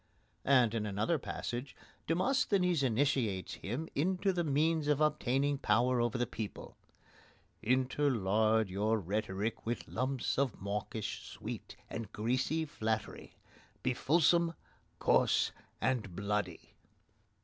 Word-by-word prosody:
And, 125 -5 +5
in 110 -2 -1
another 105 - 0
passage, 125 +1 -5 0.3
Demosthenes 180 - +2
initiates 125 -6 +1
him 125 +11 -4
into 185 +6 +1
the 175 -1 0
means 155 +1 +1
of 150 -1 +3
obtaining 145 -2 +1
power 125 -1 +3
over 120 0 0
the 120 - +1
people: 110 -2 -7 0.9
Interlard 110 -4 +2
your 105 +4 +1
rhetoric 105 +2 -2
with 120 +1 -3
lumps 130 +2 -1
Of 135 -6 0
mawkish 105 +2 -4
sweet, - - -7
and 115 -3 -6
greasy 130 +8 0
flattery. 110 -6 -3 0.5
Be 130 - +2
fulsome, 170 +5 +3 0.4
coarse, - - +3 0.3
and 115 -9 -1
bloody! 100 -3 -3
125 Hz, 110 wpm, -33 LUFS, 110-150 Hz, 0.9 s, And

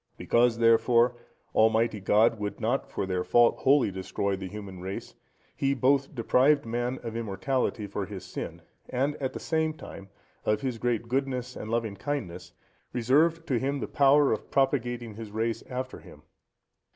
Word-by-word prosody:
Because, 120 -1 +2
therefore, 115 +1 +4 0.4
Almighty 110 0 +3
God 105 +3 +3
would 105 0 -4
not 120 +5 -1
for - - -3
their 90 -1 -1
fault 120 +7 +4
wholly 135 -6 +4
destroy 95 +1 -2
the 95 0 -6
human 100 -2 -8
race, 95 +2 -6 0.4
he 140 0 +1
both 135 +2 +2
deprived 130 +5 +3
man 120 +2 -2
of 115 -1 -5
immortality 115 +1 -1
for 100 -1 -4
his 100 -3 -8
sin, - - -7 0.3
and, 140 +4 0
at 130 -2 -3
the - - -5
same 160 -1 0
time, 100 -9 -10 0.3
of 105 0 +1
his 130 -4 -3
great 120 -1 -1
goodness 125 -1 -2
and 110 - -7
loving 115 -3 -1
kindness, 90 -9 -4 0.4
reserved 155 +8 +2
to 130 -7 0
him 140 +2 -1
the - - -3
power 140 +1 +4
of 110 - -3
propagating 120 -4 0
his 110 0 -8
race 110 +2 -2
after 130 0 -5
him. - - -15
120 Hz, 165 wpm, -28 LUFS, 105-135 Hz, 0.4 s, therefore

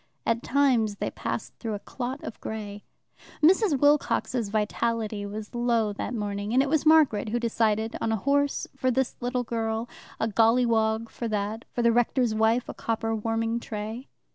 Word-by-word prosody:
At 230 0 +1
times 250 -7 +2
they - - -3
passed - - -4
through 225 -3 -3
a - - -5
clot 255 +5 -5
of - - -8
grey. 205 -2 -6 0.6
Mrs. 355 - +4
Wilcox's 265 -5 +2
vitality 215 0 -1
was 210 +1 -7
low 235 -3 +1
that 245 +4 -4
morning, 205 +1 -3
and 265 - +5
it 280 - -2
was 315 +1 +1
Margaret 295 -10 +5
who 240 +3 0
decided 225 -1 0
on 225 - 0
a - - +2
horse 280 +6 +1
for 260 -1 0
this 260 0 0
little 245 0 -1
girl, 225 0 -2 0.3
a 220 - +1
golliwog 225 0 +2
for 235 - -4
that, 215 +1 -2
for 240 - -2
the 235 - +5
rector's 240 0 +2
wife 220 +3 +2
a - - -5
copper 225 0 -2
warming 225 +1 -1
tray. 220 +3 -6
230 Hz, 170 wpm, -26 LUFS, 220-250 Hz, 0.6 s, and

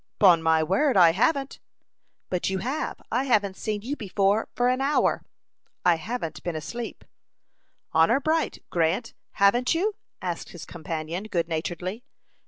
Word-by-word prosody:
"'Pon 180 -5 +6
my 160 -1 +3
word, 200 - +2
I 170 -3 +8
haven't." 270 - 0 0.7
"But 180 0 0
you 190 - -1
have; 265 +10 -3
I 250 +4 +1
haven't 205 -7 +2
seen 210 +1 -3
you 275 +5 -3
before 200 -1 +1
for 245 - +2
an 255 +1 +1
hour." 280 +2 +2 0.6
"I 175 - +6
haven't 165 -2 -5
been 175 -1 -3
asleep." 225 +10 -6 0.9
"Honor 165 +11 +4
bright, 315 +3 -1
Grant, 175 +7 0 0.2
haven't 240 +9 +3
you?" 410 +6 +1 0.3
asked 175 -2 -4
his 175 - -9
companion, 165 +2 -5
good 170 -6 -1
naturedly. 175 +6 -4
200 Hz, 145 wpm, -26 LUFS, 170-245 Hz, 0.9 s, I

